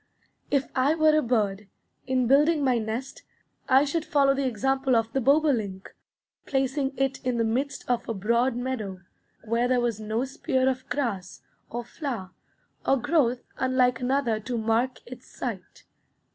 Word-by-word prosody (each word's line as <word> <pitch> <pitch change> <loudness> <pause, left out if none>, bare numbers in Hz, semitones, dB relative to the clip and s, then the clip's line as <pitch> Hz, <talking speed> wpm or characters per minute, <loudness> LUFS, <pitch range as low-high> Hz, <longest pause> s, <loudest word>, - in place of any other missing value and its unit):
If 275 -2 +1
I 275 +4 +3
were 310 -1 +4
a 310 - +4
bird, 210 -5 0 0.4
in 260 -1 +1
building 295 +4 +4
my 255 -3 +2
nest 225 +4 -5 0.5
I 265 +2 +6
should 310 +3 -1
follow 275 -3 +3
the 275 -1 0
example 265 +2 +1
of 225 0 0
the 270 - +1
bobolink, 245 -9 +1 0.5
placing 270 0 -1
it 270 0 -1
in 250 -1 0
the 230 - +2
midst 265 +5 -2
of 245 -2 -1
a - - 0
broad 235 +5 +1
meadow, 230 -7 -4 0.4
where 230 +2 +1
there 250 0 +2
was 235 -3 -1
no 220 +4 -1
spear 265 -1 0
of 260 0 -2
grass, 230 -9 -3 0.3
or 240 +1 -4
flower, 235 - -5 0.5
or 270 - +3
growth 255 -2 +1 0.2
unlike 255 -1 +2
another 250 -3 0
to 235 +3 -4
mark 230 +3 0
its 255 +1 -11
site. - - -7
255 Hz, 160 wpm, -26 LUFS, 230-275 Hz, 0.5 s, I